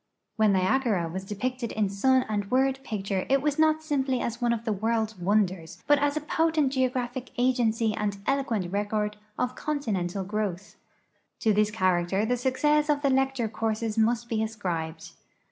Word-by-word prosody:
When 215 -2 +3
Niagara 190 -1 +1
was 185 +3 -5
depicted 235 +4 -3
in 210 -1 +1
sun 255 +7 +2
and 205 -2 -2
word 265 +2 +2
picture 195 -5 -3
it 275 +1 +4
was 295 +2 -1
not 315 0 +3
simply 270 -4 0
as 235 +1 -3
one 240 -1 +2
of 230 -1 -2
the 220 - +1
world's 220 +1 -1
wonders, 180 -3 -1
but 290 -1 +4
as 290 +1 +1
a - - -1
potent 310 -2 +1
geographic 255 -1 -1
agency 235 -3 +2
and 210 -1 -2
eloquent 230 -10 0
record 210 +1 -1 0.2
of 250 0 -1
continent 220 -13 -2
growth. 205 -2 -3 0.7
To 220 - +3
this 210 +1 +3
character 185 -1 +1
the 245 +2 +1
success 295 +4 +1
of 290 0 +1
the 275 - +3
lecture 265 -3 +1
courses 220 0 -2
must 235 +1 +1
be 225 -2 -1
ascribed. 170 -7 -4
225 Hz, 165 wpm, -27 LUFS, 205-260 Hz, 0.7 s, it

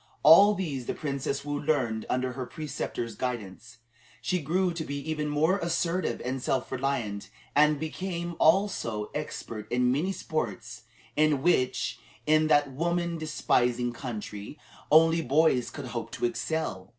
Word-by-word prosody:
All 200 +7 +8
these 145 -10 -4
the - - -2
Princess 140 -1 -3
Woo 145 0 -2
learned 125 -8 0
under 130 0 0
her 125 0 -5
preceptor's 145 -6 -4
guidance. 115 -2 -5 0.4
She 180 -1 -1
grew 175 +4 +1
to 165 -1 -4
be 140 -2 -4
even 150 -1 -1
more 160 +6 +2
assertive 170 +1 -1
and 130 +1 -2
self 130 0 -1
reliant, 125 -6 -2 0.3
and 150 0 +4
became, 170 +2 -4
also, 160 - +2
expert 115 -7 -6
in 125 0 +3
many 155 +9 0
sports 120 - -4 0.3
in 150 -2 +2
which, 145 -7 +1 0.3
in 155 0 +4
that 145 -2 +3
woman 170 +3 -1
despising 125 -6 +1
country, 110 -1 -6 0.3
only 165 +1 +6
boys 140 -3 +3
could 145 - -7
hope 115 -2 -5
to - - -1
excel. 120 -6 -2
145 Hz, 140 wpm, -28 LUFS, 125-160 Hz, 0.4 s, All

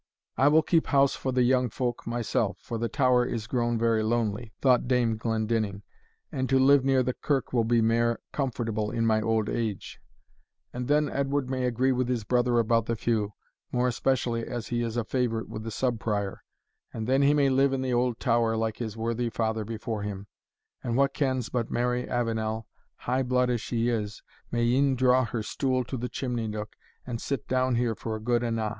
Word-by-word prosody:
"I 135 - +4
will 155 +2 +5
keep 165 +1 +2
house 140 -1 +3
for 130 - -3
the 125 0 +2
young 125 0 +3
folk 120 +2 -3
myself, 120 -1 -1
for 115 - -5
the 115 0 -1
tower 125 0 +3
is 115 -3 -3
grown 120 0 0
very 115 -1 +2
lonely," 110 0 -1
thought 125 -2 +3
Dame 120 -3 +2
Glendinning, 110 -2 -1 0.5
"and 130 -1 -2
to 135 - +4
live 135 +1 +5
near 135 -1 +3
the 125 +1 -1
kirk 135 -1 -1
will 115 -3 +2
be 115 0 +3
mair 115 +1 +2
comfortable 115 -6 -2
in 115 +1 -1
my 110 -1 +3
auld 110 -1 +1
age 110 -5 -3 0.7
and 125 0 -4
then 150 +1 +3
Edward 140 -1 -1
may 130 -1 -1
agree 125 +2 +1
with 125 -1 0
his 120 -3 -1
brother 120 +1 +2
about 115 -1 +2
the 115 - 0
feu, 110 -2 -1 0.4
more 125 0 +1
especially 120 -2 0
as 120 -2 -5
he 120 -1 0
is 115 0 -2
a 120 - +1
favourite 115 -2 -1
with 110 - -6
the 115 - -5
Sub 120 +1 -1
Prior, 100 -3 -2 0.5
and 110 -1 -4
then 135 +3 +2
he 140 +1 +4
may 140 -2 +3
live 135 +1 +3
in 135 -1 -1
the 130 -1 -1
auld 120 -1 +1
tower 115 -3 +2
like 110 -1 -1
his 110 -2 -5
worthy 115 +1 -1
father 110 -1 -1
before 110 0 -4
him 100 -1 -5 0.6
and 120 0 -1
wha 140 0 +5
kens 130 -3 -1
but 120 -3 -2
Mary 125 +1 -1
Avenel, 110 -2 -1 0.3
high 130 +2 -1
blood 125 -1 +1
as 120 -3 -1
she 115 +1 -1
is, 105 -2 -3 0.3
may 120 0 0
e'en 130 +3 +3
draw 130 0 +4
in 130 - +1
her 110 -1 -3
stool 130 +2 0
to 130 - -6
the 125 0 -3
chimney 120 -4 -3
nook, 105 0 -5 0.3
and 120 -2 -4
sit 140 - -3
down 130 -1 +1
here 120 -1 +1
for 110 0 -5
good 120 +2 +1
and 115 -1 -1
a'? 110 -1 -1
120 Hz, 205 wpm, -27 LUFS, 115-130 Hz, 0.7 s, will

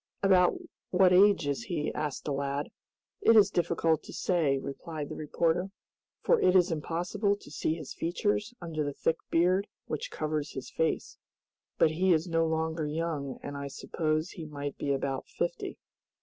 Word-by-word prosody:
"About 185 -2 +5 0.3
what 185 0 +5
age 195 -3 +6
is 140 -5 -2
he?" 155 -4 -2
asked 150 -2 -3
the 145 - -1
lad. 140 +1 -2 0.5
"It 230 - +6
is 205 -2 +7
difficult 165 -3 +1
to - - -11
say," 160 -7 +1
replied 145 +2 -6
the - - -5
reporter, 165 +4 0 0.5
"for - - +4
it 185 - +4
is 180 -1 +5
impossible 175 +6 0
to 205 - -15
see 155 +1 -1
his 155 -5 -7
features 205 +5 -1
under 160 -3 -3
the 145 -1 -3
thick 165 +3 0
beard 185 +4 +3 0.2
which - - -4
covers 155 - -3
his 130 - -7
face, 160 0 -1 0.6
but 155 - +4
he 180 +3 +3
is 160 +2 +1
no 165 -1 +2
longer 160 -1 -1
young, 150 -3 -3
and 145 - -5
I 140 0 -4
suppose 155 +4 -2
he 165 - -7
might 145 -2 -5
be 140 - -2
about 135 -1 -2
fifty." - - -3
160 Hz, 170 wpm, -30 LUFS, 150-180 Hz, 0.6 s, is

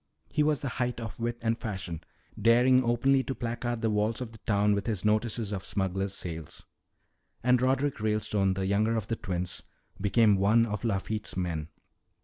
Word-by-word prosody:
He - - +1
was 150 -3 +2
the 140 - -2
height 125 0 -1
of 115 -2 -7
wit 120 0 -2
and 115 0 +2
fashion 95 -8 -5 0.4
daring 125 +3 +5
openly 130 +3 +3
to 135 0 -4
placard 120 0 -3
the 110 - +2
walls 105 +1 0
of 125 -3 -5
the 110 - -13
town 105 -1 +2
with 100 +1 -2
his 105 -4 -1
notices 110 0 +1
of 95 -2 -3
smugglers' 95 +1 -1
sales. 80 -2 -6 0.8
"And 125 0 +4
Roderick 135 +1 +1
Ralestone, 105 -2 +1
the 95 0 -1
younger 105 +4 +2
of 110 -2 -4
the 115 - 0
twins, 90 -4 -3 0.4
became 105 0 +4
one 110 +4 +4
of 105 -1 -4
Lafitte's 105 -1 -2
men. 85 -4 -2
110 Hz, 175 wpm, -29 LUFS, 100-120 Hz, 0.8 s, daring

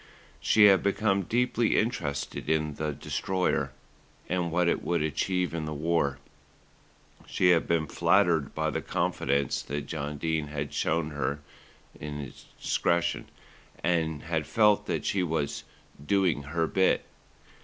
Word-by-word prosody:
She 110 - +4
had 100 -2 +7
become 100 0 +1
deeply 120 +3 +1
interested 90 - -2
in 75 -1 +1
the 75 +1 -2
Destroyer 75 -2 -1 0.6
and 90 -1 -1
what 90 +1 +2
it - - +1
would 85 -3 0
achieve 90 +3 -1
in 80 -2 -3
the 75 0 -4
war. 75 -3 0 1.1
She 90 - +2
had 85 -2 +3
been 85 -2 +1
flattered 85 -3 +2
by - - 0
the - - -2
confidence 70 0 0
that 75 0 -4
John 75 -2 -4
Dene 80 0 -1
had 75 -1 -4
shown 80 -1 0
hi - - -9
her 70 +1 -1 1.2
discretion, 85 0 0 0.5
and 80 -3 0
had 80 -2 -2
felt 105 -2 +3
that - - -2
she 100 - +1
was 80 -5 -2 0.4
"doing 90 -3 +2
her 80 +2 0
bit." 95 +3 +2
80 Hz, 135 wpm, -28 LUFS, 75-90 Hz, 1.2 s, had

